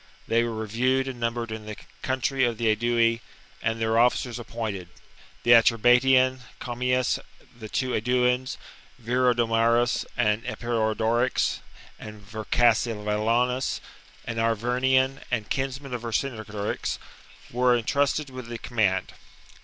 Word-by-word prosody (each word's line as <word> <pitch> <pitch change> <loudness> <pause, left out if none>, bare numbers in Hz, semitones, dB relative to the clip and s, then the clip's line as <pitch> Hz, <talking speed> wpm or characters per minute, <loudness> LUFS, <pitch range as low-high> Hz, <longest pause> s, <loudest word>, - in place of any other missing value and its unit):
They 115 +1 +3
were 115 -1 -3
reviewed 125 +5 0
and 130 -2 -6
num 115 0 -1
bered 115 -1 -4
in 110 -1 -7
the 105 - -5 0.3
country 130 0 0
of 120 -2 +1
the 115 -1 +1
Aedui, 115 +1 +2 0.4
and 110 0 -1
their 110 0 +2
officers 120 0 +2
appointed. 110 -6 -5 0.6
The 120 - +3
Atrebatian, 125 +3 +5 0.2
Commius, 125 +1 0 0.4
the 110 -3 -9
two 130 +2 -1
Aeduans, 125 +2 +1 0.4
Viridomarus 120 -1 +2
and 110 -2 +1
Eporedorix, 120 0 0 0.4
and 105 0 -9
Vercassivellaunus, 115 +2 +1 0.5
an 115 -1 -5
Arvernian 125 +4 +1
and 110 -5 -2
kinsman 135 0 -3
of 120 - -3
Vercingetorix, 110 -4 -3 0.5
were 125 0 +3
entrusted 140 +4 0
with 130 -2 -8
the 120 0 -5
com 120 +1 -11
mand. 95 -4 +1
120 Hz, 120 wpm, -26 LUFS, 110-125 Hz, 0.6 s, Atrebatian